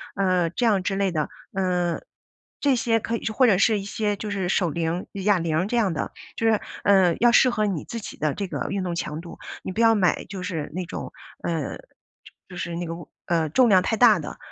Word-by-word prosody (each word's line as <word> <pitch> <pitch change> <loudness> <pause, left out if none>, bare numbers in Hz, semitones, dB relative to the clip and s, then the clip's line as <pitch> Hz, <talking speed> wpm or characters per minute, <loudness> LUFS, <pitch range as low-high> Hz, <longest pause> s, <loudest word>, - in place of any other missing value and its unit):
呃， 185 -3 +2
这 235 +8 -1
样 205 -5 +3
之 195 +1 -1
类 195 -1 +1
的。 155 -3 -1 0.2
嗯， 180 -2 0 0.6
这 280 -2 +3
些 230 -1 +1
可 230 +1 -3
以 - - -5
是 225 - -1
或 255 +4 +4
者 200 -5 +4
是 210 +2 +3
一 195 - -7
些 210 0 -1
就 210 - -5
是 195 -3 -2
手 180 -2 +2
铃、 165 +2 -2
哑 200 -1 +2
铃 165 +1 0
这 240 - 0
样 205 -7 +2
的。 155 - -3 0.2
就 225 - -2
是， 220 -2 +3 0.2
呃， 190 -4 +4
要 240 0 +6
适 255 +1 +6
合 215 -3 0
你 190 -7 -2
自 230 - -5
己 - - -8
的 150 -2 0
这 200 - -4
个 - - -4
运 195 -1 -2
动 175 -2 -2
强 160 -2 -4
度。 170 - -11 0.2
你 - - -4
不 185 - -5
要 225 -1 +5
买 185 -4 +1
就 190 -2 -7
是 165 -6 -4
那 185 - -2
种， - - -7 0.3
呃， 165 -2 -2
就 - - -16 0.7
就 180 - -9
是 170 -1 -4
那 175 +1 -3
个， 165 0 -5
物 170 - -11 0.2
呃， 165 -2 +1
重 245 - +4
量 190 -3 +6
太 225 - 0
大 220 -4 +6
的。 150 - -7
190 Hz, 260 characters per minute, -24 LUFS, 170-215 Hz, 0.7 s, 要